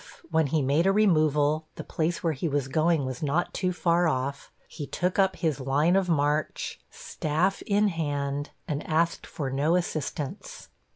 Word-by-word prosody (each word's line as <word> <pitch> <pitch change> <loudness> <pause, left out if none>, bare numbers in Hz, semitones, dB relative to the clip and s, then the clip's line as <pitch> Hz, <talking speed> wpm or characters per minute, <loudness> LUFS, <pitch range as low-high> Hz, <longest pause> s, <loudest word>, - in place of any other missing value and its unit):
If, - - -17
when 160 -2 +3
he 150 +1 +1
made 145 +7 +2
a - - +5
removal, 155 -6 +2
the - - -6
place 165 +2 -2
where 165 -2 +1
he 150 +4 -3
was 145 -3 -1
going 155 +1 +2
was 130 -1 -5
not 155 +4 0
too 185 -2 0
far 175 -1 +2
off, 140 -1 -2 0.2
he 145 - -7
took 180 +2 -1
up 190 -1 +3
his 155 -5 -1
line 145 +6 +2
of 190 -2 +2
march, 150 -1 0
staff 160 +6 -1
in 205 0 +3
hand, 145 -4 -2 0.2
and 150 -1 -2
asked 165 +2 0
for 135 -4 -4
no 145 +5 +2
assistance. 155 -5 -4
155 Hz, 175 wpm, -27 LUFS, 145-175 Hz, 0.2 s, a